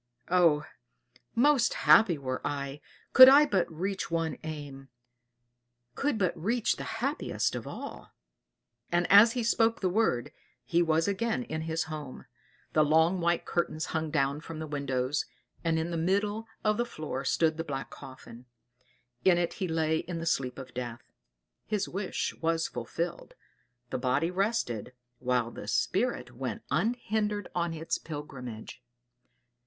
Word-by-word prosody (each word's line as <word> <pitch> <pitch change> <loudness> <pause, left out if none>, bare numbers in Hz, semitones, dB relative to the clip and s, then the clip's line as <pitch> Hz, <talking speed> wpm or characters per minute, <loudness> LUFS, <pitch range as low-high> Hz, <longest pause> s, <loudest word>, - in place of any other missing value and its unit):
Oh! 170 -5 +4 0.7
most 260 -1 +4
happy 205 -8 +5
were 130 -2 -4
I, 140 0 -4 0.3
could 260 0 +12
I 285 +2 +8
but 190 -11 0
reach 190 +4 -3
one 165 -1 -1
aim 145 -3 -7 1.0
could 285 -4 0
but 185 -5 +1
reach 225 +8 0
the - - -5 0.2
happiest - - -1
of - - -5
all!" - - -8 0.8
And 175 +1 +2
as 210 +4 +8
he 245 - -1
spoke 230 0 +2
the 185 -2 0
word 190 - +1 0.3
he 170 +8 +2
was 165 0 +2
again 225 +5 0
in 160 -9 -4
his 160 +1 -1
home; 150 -4 -7 0.5
the 155 - +5
long 160 +4 +3
white 170 0 +1
curtains 160 -2 -1
hung 160 -1 -1
down 140 -1 0
from 165 0 -8
the 155 - -4
windows, 140 -2 -1 0.4
and 165 -1 +1
in 160 +2 -2
the 170 - -2
middle 205 +6 0 0.2
of 215 -1 +2
the 240 - +2
floor 155 - -5
stood 160 +3 +1
the 165 - -2
black 135 -4 -5
coffin; 125 -2 -12 0.8
in 185 -2 +5
it 175 -1 0
he 185 - +1
lay 160 -1 +1
in 175 -1 -5
the 165 - -4
sleep 130 -6 -1
of 130 -2 -9
death. 120 -1 -5 0.6
His 205 -2 -1
wish 190 +1 -3
was 165 0 +1
fulfilled 165 +9 -5 0.6
the - - -2
body 140 +7 +1
rested, 180 - -1 0.3
while 125 -2 0
the - - -9
spirit 185 - -1
went 130 0 -4
unhindered 210 - -1
on 170 -1 -1
its 160 +1 -2
pilgrimage. 130 -7 -8
165 Hz, 150 wpm, -29 LUFS, 140-195 Hz, 1.0 s, could